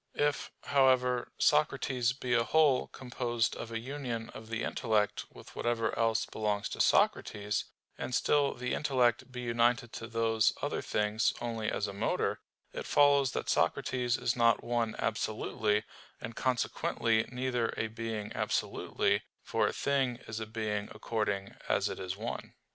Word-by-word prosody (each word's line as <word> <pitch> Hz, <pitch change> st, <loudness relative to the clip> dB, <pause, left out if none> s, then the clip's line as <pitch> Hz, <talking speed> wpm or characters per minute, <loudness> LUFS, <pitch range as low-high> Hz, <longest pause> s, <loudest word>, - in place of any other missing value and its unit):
If, 145 Hz, 0 st, +1 dB
however, 130 Hz, -3 st, +3 dB
Socrates 135 Hz, -5 st, +2 dB
be 125 Hz, -1 st, -2 dB
a 120 Hz, -1 st, +4 dB
whole 140 Hz, +1 st, +3 dB
composed 120 Hz, -2 st, -2 dB
of 115 Hz, -, -7 dB
a 115 Hz, -, -2 dB
union 120 Hz, -2 st, -4 dB
of 110 Hz, 0 st, -10 dB
the 115 Hz, 0 st, -2 dB
intellect 105 Hz, -3 st, 0 dB
with -, -, -14 dB
whatever 115 Hz, -2 st, 0 dB
else 115 Hz, -1 st, +2 dB
belongs 105 Hz, -1 st, -2 dB
to -, -, -2 dB
Socrates, 105 Hz, 0 st, +2 dB, 0.3 s
and 125 Hz, -, -2 dB
still 145 Hz, -1 st, +2 dB
the 125 Hz, +1 st, -3 dB
intellect 130 Hz, -4 st, +1 dB
be 125 Hz, 0 st, -5 dB
united 120 Hz, 0 st, +1 dB
to 115 Hz, -, -6 dB
those 115 Hz, -2 st, +2 dB
other -, -, -2 dB
things 105 Hz, +1 st, +1 dB
only 115 Hz, -2 st, -2 dB
as 105 Hz, -, -1 dB
a 100 Hz, -, -5 dB
motor, 100 Hz, -, 0 dB, 0.3 s
it -, -, -5 dB
follows 140 Hz, -2 st, +4 dB
that -, -, -3 dB
Socrates 125 Hz, -2 st, +1 dB
is 120 Hz, -, 0 dB
not 115 Hz, -2 st, +3 dB
one 120 Hz, -2 st, 0 dB
absolutely, 105 Hz, -1 st, 0 dB, 0.4 s
and 115 Hz, 0 st, -7 dB
consequently 115 Hz, -3 st, +1 dB
neither 125 Hz, -2 st, 0 dB
a -, -, 0 dB
being 110 Hz, -1 st, -4 dB
absolutely, -, -, 0 dB, 0.2 s
for -, -, +1 dB
a -, -, 0 dB
thing 135 Hz, -3 st, +1 dB
is 110 Hz, 0 st, -4 dB
a 110 Hz, -, -5 dB
being 105 Hz, -2 st, -2 dB
according 105 Hz, -3 st, -2 dB, 0.2 s
as -, -, +2 dB
it -, -, -5 dB
is 95 Hz, +1 st, -4 dB
one. 115 Hz, +3 st, -5 dB
115 Hz, 155 wpm, -31 LUFS, 110-125 Hz, 0.4 s, a